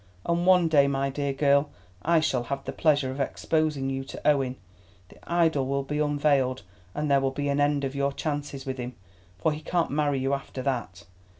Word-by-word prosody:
And 170 +1 0
one 180 -2 +6
day, 145 -3 +5
my 135 0 0
dear 140 0 -2
girl, 140 +1 +3 0.3
I 165 0 +3
shall 130 -6 0
have 135 +2 -4
the - - -3
pleasure 145 -4 +2
of 135 - -7
exposing 150 0 0
you 135 0 -3
to - - -6
Owen; 135 -4 +2 0.5
the - - -17
idol 160 -6 +2
will 140 0 0
be 150 +2 -3
unveiled, 145 -3 +1 0.3
and 150 -1 -1
there 140 -1 +4
will 135 - +1
be 145 +1 -3
an 140 +1 +1
end 145 0 +2
of 135 0 -2
your 140 0 0
chances 145 -2 -4
with 130 -1 -4
him, 125 0 -5 0.4
for 130 +11 +1
he 150 +1 -5
can't 170 -2 0
marry 145 -1 +1
you 135 +1 0
after 135 -1 -4
that. 120 -8 -3
140 Hz, 205 wpm, -27 LUFS, 135-150 Hz, 0.5 s, one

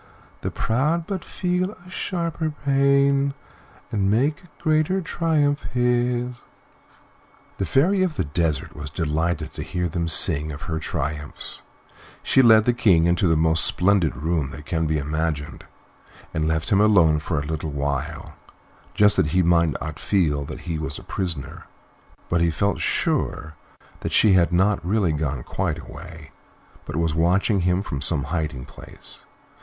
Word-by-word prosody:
The - - -2
proud 150 +9 0
but 190 -1 -4
feel 180 +2 -2
a - - -13
sharper 170 -4 -3 0.2
pain, 140 0 +3 0.6
And 100 -2 0
make 135 +8 +1
a - - -17
greater 155 +3 +1
triumph 155 -4 0
his." 125 0 0 1.2
The 95 - -2
Fairy 180 - +2
of 180 -4 0
the - - 0
Desert 75 -1 -2
was 75 -1 -7
delighted 80 +2 -2
to - - -7
hear 90 0 -2
them 85 0 -2
sing 80 -2 +5
of 70 - -8
her 80 -1 -3
triumphs; 75 -1 -5 0.6
she 135 - +4
led 110 -3 +6
the 120 - +3
King 95 -9 +3
into 85 +2 +2
the 80 -1 +3
most 80 0 +2
splendid 90 -4 +2
room 75 0 -1
that 75 +1 -10
can 80 -1 -1
be 80 0 0
imagined, 75 0 -3 0.7
and 80 0 -1
left 80 0 -1
him 100 0 +4
alone 90 -8 +4
for 75 0 -2
a 70 - -5
little 80 0 -4
while, 70 +2 -4 0.6
just 105 0 +4
that 95 -5 +3
he 90 - +4
might 85 -3 +2
not 75 0 -6
feel 75 -8 0
that 75 - -8
he 80 -2 -4
was 70 -2 -4
a - - -11
prisoner; 80 -8 -5 0.6
but 85 0 0
he 85 - +3
felt 100 +5 -1
sure 75 +1 -1 0.5
that - - -4
she 105 -3 +5
had 90 -2 +3
not 95 0 +2
really 95 -1 +1
gone 75 -4 -2
quite - - -2
away, 80 -3 -11 0.5
but 75 - -6
was 80 -1 0
watching 90 +5 +2
him 90 +2 +1
from 70 -9 -5
some 70 +1 +4
hiding 75 -4 -3
place. - - -13
85 Hz, 160 wpm, -23 LUFS, 75-120 Hz, 1.2 s, led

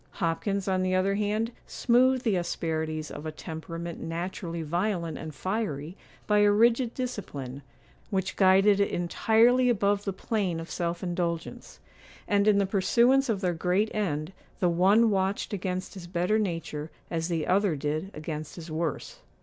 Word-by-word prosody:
Hopkins, 195 +3 -1
on 185 -1 +1
the 185 0 +1
other 190 +1 +2
hand, 210 +3 0 0.2
smoothed 255 +1 +3
the 220 -6 +2
asperities 160 -3 -2
of 155 - -6
a - - -3
temperament 165 +2 -7
naturally 170 0 -4
violent 170 0 -1
and 155 -2 -7
fiery 175 -3 -3 0.3
by 210 0 +3
a 205 0 +5
rigid 230 +3 +3
discipline, 145 - -5 0.5
which 190 -2 -1
guided 195 +1 +5
it 200 - +2
entirely 230 +8 +3
above 205 -3 +2
the 195 - -2
plane 190 -3 -2
of 165 - -8
self 170 0 -2
indulgence; 175 -2 -3 0.5
and, 205 0 +2
in 210 -1 +5
the 200 - +3
pursuance 235 +7 +3
of 205 -4 0
their 180 -2 +1
great 180 +6 0
end, 165 -5 -2 0.3
the 180 - +3
one 200 +6 +4
watched 195 +1 -1
against 185 -1 -3
his 185 -3 -9
better 180 +5 +1
nature 165 -6 -3 0.2
as 165 -1 -1
the 165 -3 -1
other 190 -2 +2
did 155 +5 -2
against 155 -1 -6
his 165 -2 -9
worse. 160 -1 -3
185 Hz, 160 wpm, -28 LUFS, 165-205 Hz, 0.5 s, a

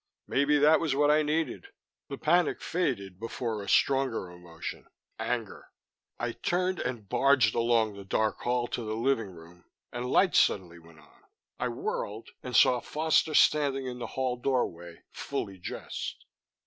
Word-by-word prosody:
Maybe 140 +2 +2
that 150 +2 +5
was 155 -5 0
what 145 +1 +4
I 155 +1 +4
needed. 160 - -1 0.4
The 140 - -5
panic 175 +3 +2
faded 100 - -2
before 115 -1 -4
a 100 - -7
stronger 135 -9 +2
emotion 85 -2 -8 0.3
anger. - - -4 0.5
I 120 0 -2
turned 180 +7 -1
and 120 -5 -4
barged 130 -2 +3
along 115 -2 +2
the 100 0 -9
dark 110 +3 0
hall 120 0 0
to 120 - -3
the 110 0 -3
living 115 -3 0
room 85 0 -15 0.3
and 120 +1 -4
lights 185 +3 +4
suddenly 85 -3 +1
went 80 -2 -18
on. 75 - -23 0.4
I 125 - 0
whirled 115 -2 -4
and 125 -2 -5
saw 125 +2 +6
Foster 155 0 +1
standing 140 -3 +3
in 125 -1 -5
the - - -4
hall 130 -2 0
doorway, 85 -10 -2
fully 95 -1 -5
dressed. 90 - -6
120 Hz, 155 wpm, -29 LUFS, 100-140 Hz, 0.5 s, saw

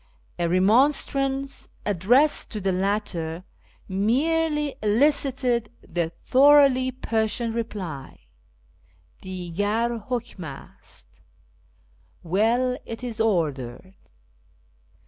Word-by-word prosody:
A 170 -1 +1
remonstrance 270 +7 +1 0.2
addressed 230 - +3
to 215 - -5
the 195 -1 0
latter 185 -3 -2 0.4
merely 295 +9 +1
elicited 250 0 +1 0.2
the 170 -1 -1
thoroughly 270 - +4
Persian 230 -2 -1
reply, 190 - -6 0.5
" 85 +7 -35
Digar... 205 +5 -2
Imkm 240 -6 -4
ast 140 -4 -12 0.3
" - - -37
(" - - -35
Well... 230 +8 +1
it 230 +2 -8
is 235 -2 -3
ordered.") 160 - -1
220 Hz, 90 wpm, -24 LUFS, 185-255 Hz, 0.5 s, thoroughly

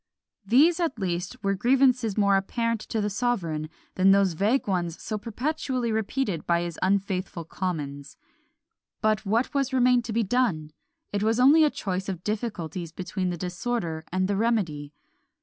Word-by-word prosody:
These, 295 - +4
at 330 -8 -1
least, 180 -3 -3
were 195 0 +2
grievances 245 0 +2
more 200 -1 +4
apparent 230 +3 -1
to 225 - -1
the 210 - 0
sovereign 180 -10 -1 0.2
than 190 +1 +4
those 195 -2 +4
vague 210 +11 +1
ones 175 -4 -1
so 215 -1 -4
perpetually 255 +2 -2
repeated 220 - -2
by 170 0 +2
his 170 -2 -6
unfaithful 190 -3 -1
commons. 145 -6 -5 0.9
But 215 -1 +1
what 230 +8 +1 0.2
remained 250 -2 +3
to 230 - -4
be 230 +1 +2
done? 195 -9 0 0.4
It 205 - 0
was 225 +2 +1
only 290 +5 +7
a 305 - +5
choice 190 -6 -3
of 180 -2 -5
difficulties 185 -7 -4
between 185 +1 -3
the 175 - -3
disorder 175 -2 -3
and 185 +1 +1
the 200 - 0
remedy. 190 -10 0
200 Hz, 155 wpm, -26 LUFS, 180-235 Hz, 0.9 s, only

